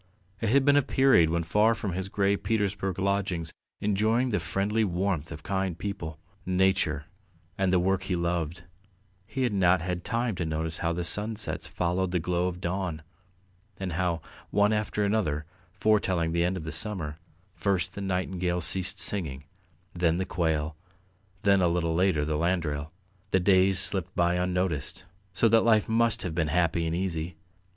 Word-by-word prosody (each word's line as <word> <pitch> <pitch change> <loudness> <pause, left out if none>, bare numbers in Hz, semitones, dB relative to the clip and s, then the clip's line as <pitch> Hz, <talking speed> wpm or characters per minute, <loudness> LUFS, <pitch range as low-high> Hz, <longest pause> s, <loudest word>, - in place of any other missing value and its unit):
It 110 - 0
had 135 +3 +4
been 145 0 +5
a - - +6
period 130 - +4
when 85 +1 0
far 105 +7 +3
from 105 -5 -4
his 95 +2 -3
grey 100 0 +2
Petersburg 100 -4 -1
lodgings, 95 -4 -1 0.3
enjoying 110 +5 +1
the 105 - +1
friendly 100 +7 0
warmth 90 -4 -1
of 80 -1 -8
kind 95 -3 -1
people, 85 -6 -5 0.3
nature, 95 -5 +1 0.5
and 95 -1 +1
the 95 - +4
work 95 +2 +1
he 95 - -1
loved, 85 -1 -2 0.6
he 120 +4 -2
had 120 -4 +1
not 95 -2 +4
had 90 -1 -3
time 120 -1 -1
to 90 - -1
notice 80 0 -3
how 85 - 0
the 85 +1 -2
sunsets 105 +5 -1
followed 90 +1 -1
the 90 - 0
glow 90 +1 0
of 90 -1 -4
dawn, 90 -3 -3 0.8
and 95 -2 -3
how, 85 -1 -1 0.3
one 105 +1 +3
after 105 -1 -1
another 90 -8 0 0.3
foretelling 95 -5 +1
the 85 +1 +1
end 90 +2 0
of 80 -3 -6
summer, 80 -3 -2 0.3
first 95 -2 -1
the 100 - -6
nightingale 90 -2 -1
ceased 90 +2 -1
singing, 75 -9 -1 0.5
then 85 -1 +1
the 95 - -1
quail, 80 -4 -1 0.7
then 100 -1 +4
a 90 - +4
little 85 -1 0
later 85 -4 +2
the 75 0 -1
landrail. 80 -3 -1 0.4
The 95 - +3
days 95 0 +4
slipped 95 -1 +1
by 85 0 +2
unnoticed, 90 -4 -1 0.3
so 95 +6 +2
that 115 +1 +5
life 110 -3 +3
must 115 0 +2
have 90 - -3
been 80 -1 0
happy 85 +1 +1
and 80 - -1
easy. 85 -2 -3
90 Hz, 170 wpm, -28 LUFS, 85-100 Hz, 0.8 s, a